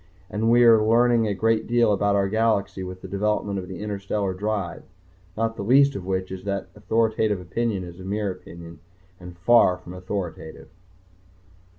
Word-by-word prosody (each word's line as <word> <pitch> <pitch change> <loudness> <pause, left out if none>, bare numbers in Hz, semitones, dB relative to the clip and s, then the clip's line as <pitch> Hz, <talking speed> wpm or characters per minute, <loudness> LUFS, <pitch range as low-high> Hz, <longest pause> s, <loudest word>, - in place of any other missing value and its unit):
and 110 +2 0
we 120 +1 +5
are 115 -2 +6
learning 115 0 +3
a 105 - 0
great 110 +2 +1
deal 120 -2 +3
about 100 0 +1
our 100 -1 +2
galaxy 105 -2 0
with 95 0 -8
the - - -6
development 100 0 -1
of 90 - -7
the 95 -1 -8
interstellar 100 -1 -2
drive 100 -1 -3 0.6
not 115 0 -1
the - - -6
least 140 +6 +4
of 95 -2 -6
which 95 -1 -2
is 95 -1 -7
that 100 -1 -3
authoritative 110 -1 0
opinion 100 +3 -2
is 90 0 -10
mere 100 +2 -2
opinion 85 -2 -11 0.4
and 90 -1 -11
far 95 -1 +4
from 90 0 -11
authoritative. 90 -3 -6
100 Hz, 170 wpm, -24 LUFS, 95-110 Hz, 0.6 s, are